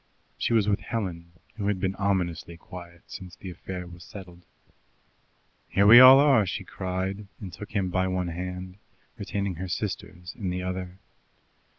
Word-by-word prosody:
She - - -2
was 110 -3 +3
with 100 -1 +2
Helen, 90 -8 -4 0.3
who 100 -2 -2
had 100 -2 0
been 95 0 0
ominously 90 -4 -1
quiet 85 0 -11
since 90 -2 -10
the 95 0 -8
affair 90 +1 -7
was 85 0 -12
settled. 90 -4 -12 1.2
"Here 100 - +3
we 115 +4 +11
all 130 +1 +11
are!" 140 -6 +5
she - - -3
cried, 95 +2 -4
and 95 -5 -8
took 105 +6 -9
him 95 -4 0
by 95 +1 +1
one 90 -1 -1
hand, 90 +2 -6 0.4
retaining 100 -3 -3
her 95 +2 -4
sister's 90 0 -5
in 100 -6 -4
the 90 0 -3
other. 90 0 -5
95 Hz, 165 wpm, -27 LUFS, 90-100 Hz, 1.2 s, we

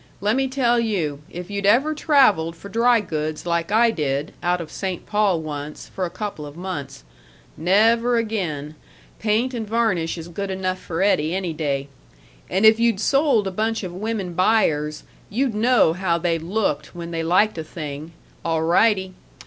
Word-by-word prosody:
Lemme 250 +6 +1
tell 245 -3 +2
you, 170 -11 -1
if 180 +3 -8
you'd 200 0 -1
ever 265 +9 +4
traveled 255 - +3
for 200 +4 -11
dry 235 +1 +3
goods 155 -4 -4
like 170 +1 -1
I 230 +2 +4
did, 145 -5 -2
out 180 0 +1
of 165 -2 -7
St. 190 -3 -4
Paul 205 -5 +1
once, 150 -1 -7
for 185 - -3
a - - -4
couple 185 -3 -5
of 145 +1 -9
months 150 - -6 0.5
nev 215 +8 +3
er 245 0 +2
again; 175 -10 -2 0.5
paint 225 +4 +1
and 225 -3 -4
varnish 215 -8 0
is 165 0 -7
good 195 +3 -5
enough 185 -1 -2
for 170 +1 -2
Eddie 165 -4 +2
any 185 -3 -2
day 140 -3 -2 0.6
and 190 +4 +2
if 220 +1 +7
you'd 230 -4 +2
sold 270 -3 +3
a 190 - -2
bunch 220 +3 -1
of 180 -2 -5
women 200 -2 -3
buyers, 160 -6 +1 0.3
you'd 245 +3 0
know 220 -6 +3
how 175 -1 0
they 170 -1 0
looked 165 -4 -2
when 170 -1 -6
they 165 -1 -2
liked 180 +3 +2
a - - -3
thing, 155 -1 -7 0.3
alrightee! 185 +4 +2
185 Hz, 175 wpm, -22 LUFS, 165-220 Hz, 0.6 s, if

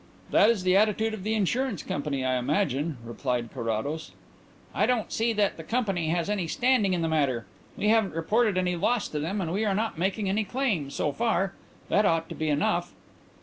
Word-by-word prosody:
"That 210 - +6
is 220 -5 +1
the 185 0 +3
attitude 215 +2 +2
of 220 - -5
the 215 +2 0
insurance 220 - 0
company, 140 -3 -2
I 130 0 +1
imagine," 145 +1 0
replied 120 0 -2
Carrados. 130 +6 -3 0.6
"I - - +2
don't 245 -4 0
see 230 +1 +1
that 205 -2 +1
the 165 - -7
company 195 -6 -1
has 170 +1 0
any 200 -5 -1
standing 230 -2 +2
in 170 - -1
the - - +1
matter. 140 -7 0 0.3
We 210 - +1
haven't 220 -6 +2
reported 210 +5 +1
any 180 -1 +1
loss 235 +6 +1
to 150 - -3
them 175 +8 -2
and 170 -2 -2
we 205 +3 0
are 200 -3 +1
not 215 -5 -2
making 195 +3 0
any 205 +3 +1
claim, 205 - -1
so 145 - -1
far. 195 -2 0 0.4
That 210 - +3
ought 165 0 +1
to - - -6
be 155 -1 -2
enough." 145 0 0
185 Hz, 200 wpm, -27 LUFS, 155-215 Hz, 0.6 s, That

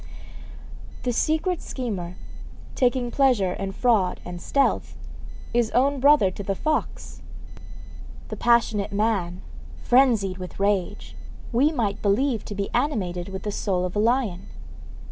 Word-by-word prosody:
The 245 - 0
secret 320 +7 0
schemer, 195 -9 -5 0.6
taking 245 -2 +1
pleasure 240 -10 +2
in 195 +1 -4
fraud 210 -4 +1
and 175 0 -7
stealth, 280 -1 0 0.6
is 235 -2 +2
own 275 +3 +3
brother 280 -8 +5
to 195 - -7
the 195 0 -2
fox. 310 +9 -3 1.1
The - - -4
passionate 225 -4 +2
man, 200 -4 -1 0.4
phrenzied 230 -8 +3
with 180 +1 -8
rage, 200 -2 -1 0.4
we 265 +6 +3
might 220 -9 -2
believe 225 +4 +1
to 205 - -6
be 200 0 -3
animated 195 -10 -1
with 190 0 -6
the 210 - -2
soul 185 -3 -1
of 180 - -5
a - - +1
lion. 230 -4 0
215 Hz, 130 wpm, -24 LUFS, 195-255 Hz, 1.1 s, brother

